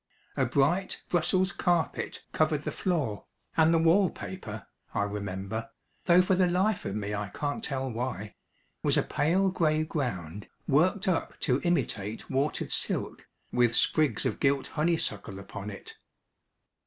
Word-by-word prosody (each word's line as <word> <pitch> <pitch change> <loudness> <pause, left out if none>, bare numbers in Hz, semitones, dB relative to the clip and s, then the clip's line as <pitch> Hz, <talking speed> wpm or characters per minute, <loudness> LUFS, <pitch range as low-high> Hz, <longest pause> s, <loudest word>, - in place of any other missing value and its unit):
A - - +2
bright 175 +8 +1
Brussels 185 +2 +2
carpet 175 -2 0
covered 155 -1 +1
the - - -2
floor, 150 - -1 0.3
and 160 0 +5
the 165 - +5
wall 165 +4 +5
paper, 110 - -7 0.3
I 100 - +2
remember 100 +2 -4 0.4
though 180 0 +6
for 185 - +2
the 185 0 +4
life 190 +3 +1
of 100 - -3
me 105 -1 -3
I 105 0 -3
can't 145 +5 -3
tell 135 -2 -2
why 115 -3 -4 0.5
was - - +3
a - - +3
pale 180 +6 +2
grey 155 -4 +2
ground, 105 - -3 0.2
worked 185 +8 +3
up 180 -3 0
to 130 -1 +2
imitate 110 - -1
watered 135 +3 0
silk, - - -2 0.3
with 120 -1 +3
sprigs 155 -3 +2
of - - -1
gilt 140 -1 +2
honeysuckle 150 - -1
upon 100 +1 -7
it. 100 - -9
145 Hz, 145 wpm, -29 LUFS, 105-175 Hz, 0.5 s, though